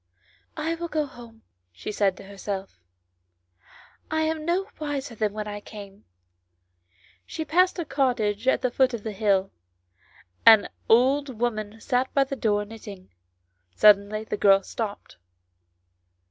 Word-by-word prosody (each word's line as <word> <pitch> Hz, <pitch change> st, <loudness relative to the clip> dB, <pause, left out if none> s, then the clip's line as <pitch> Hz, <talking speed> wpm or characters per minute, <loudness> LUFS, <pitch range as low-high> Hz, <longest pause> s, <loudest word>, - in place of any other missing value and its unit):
" 90 Hz, +3 st, -37 dB
I 330 Hz, -, +1 dB
will 340 Hz, +1 st, -4 dB
go 310 Hz, -2 st, -1 dB
home," 235 Hz, -4 st, -14 dB, 0.3 s
she 90 Hz, -, -7 dB
said 200 Hz, -2 st, +1 dB
to -, -, -11 dB
herself; 195 Hz, -, -6 dB, 0.7 s
" 90 Hz, 0 st, -49 dB, 0.5 s
I 315 Hz, 0 st, 0 dB
am 315 Hz, -1 st, -1 dB
no 365 Hz, +3 st, +1 dB
wiser 285 Hz, -4 st, -4 dB
than 215 Hz, -2 st, -1 dB
when 210 Hz, 0 st, -5 dB
I 205 Hz, 0 st, -5 dB
came." 205 Hz, -1 st, -12 dB, 1.2 s
She 320 Hz, -, -5 dB
passed 365 Hz, +4 st, +3 dB
a 340 Hz, -, -3 dB
cottage 250 Hz, -6 st, 0 dB
at -, -, +2 dB
the 255 Hz, -, +1 dB
foot 255 Hz, -1 st, +2 dB
of 215 Hz, -, -8 dB
the 220 Hz, -, -4 dB
hill; 195 Hz, -2 st, +1 dB, 0.9 s
an 220 Hz, -2 st, +7 dB, 0.2 s
old 260 Hz, +2 st, +3 dB
woman 220 Hz, -2 st, -2 dB
sat 255 Hz, +2 st, 0 dB
by 275 Hz, -, +5 dB
the 275 Hz, 0 st, -5 dB
door 210 Hz, -4 st, 0 dB
knitting. 205 Hz, -3 st, -11 dB, 0.6 s
Suddenly 210 Hz, 0 st, +4 dB
the 220 Hz, -, -4 dB
girl 195 Hz, -1 st, +5 dB
stopped. 210 Hz, -1 st, -6 dB
225 Hz, 145 wpm, -25 LUFS, 205-275 Hz, 1.2 s, an